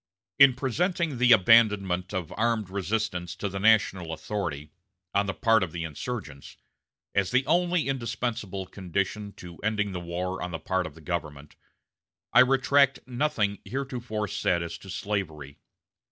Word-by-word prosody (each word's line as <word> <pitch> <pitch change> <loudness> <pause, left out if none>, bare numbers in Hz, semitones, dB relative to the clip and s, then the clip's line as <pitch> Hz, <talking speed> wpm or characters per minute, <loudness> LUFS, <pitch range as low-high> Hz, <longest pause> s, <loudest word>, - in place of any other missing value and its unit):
In 140 -3 +8
presenting 155 +2 -1
the 125 -1 +5
abandonment 100 -4 +4
of 95 -5 -4
armed 110 -3 0
resistance 100 -2 -2
to 100 - -3
the 95 0 -4
national 95 -5 +3
authority, 75 -6 -4 0.4
on 100 0 +2
the 95 - -1
part 115 -1 +3
of 90 -4 -2
the 85 -1 -3
insurgents, 80 - -6 0.6
as 100 -2 +1
the 130 +1 +2
only 175 +1 +2
indispensable 115 -6 -3
condition 100 +2 -3
to 85 -2 -11
ending 105 -1 -1
the 90 - -4
war 90 +2 -4
on 90 - -3
the 85 - -4
part 95 +3 -1
of - - -12
the 80 - -14
government, 75 -4 -5 0.8
I - - +7
retract 135 +1 +4
nothing 120 -6 -1
heretofore 120 -5 -4
said 85 -2 0
as 85 - -6
to 95 - -13
slavery. 85 -9 -4
100 Hz, 150 wpm, -27 LUFS, 90-120 Hz, 0.8 s, In